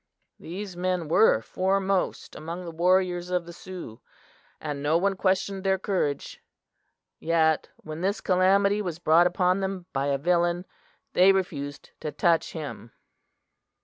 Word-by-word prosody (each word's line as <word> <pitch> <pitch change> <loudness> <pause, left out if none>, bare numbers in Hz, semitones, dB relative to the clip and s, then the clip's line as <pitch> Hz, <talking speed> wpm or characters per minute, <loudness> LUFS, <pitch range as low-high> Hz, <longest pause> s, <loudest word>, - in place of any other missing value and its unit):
These 190 +2 -7
men 180 -2 -1
were 165 - +5
foremost 190 +3 -1
among 170 +4 -6
the 170 - -6
warriors 180 +1 +1
of 180 -1 -1
the 170 - -10
Sioux, 170 -11 -9 0.6
and 145 -2 -4
no 150 +3 +2
one 195 +2 +1
questioned 190 0 0
their 190 0 +2
courage; 185 -7 -2 0.8
yet 160 -1 +2
when 155 +1 -8
this 200 +3 0
calamity 200 +2 +3
was 175 -5 -4
brought 170 0 +5
upon 180 +1 +1
them 190 -2 -3
by 135 +1 0
a 140 -1 +1
villain, 175 +3 +1 0.5
they 185 +2 +6
refused 145 -7 -3
to 150 - -4
touch 170 0 +1
him! 145 -7 -7
180 Hz, 140 wpm, -26 LUFS, 160-190 Hz, 0.8 s, they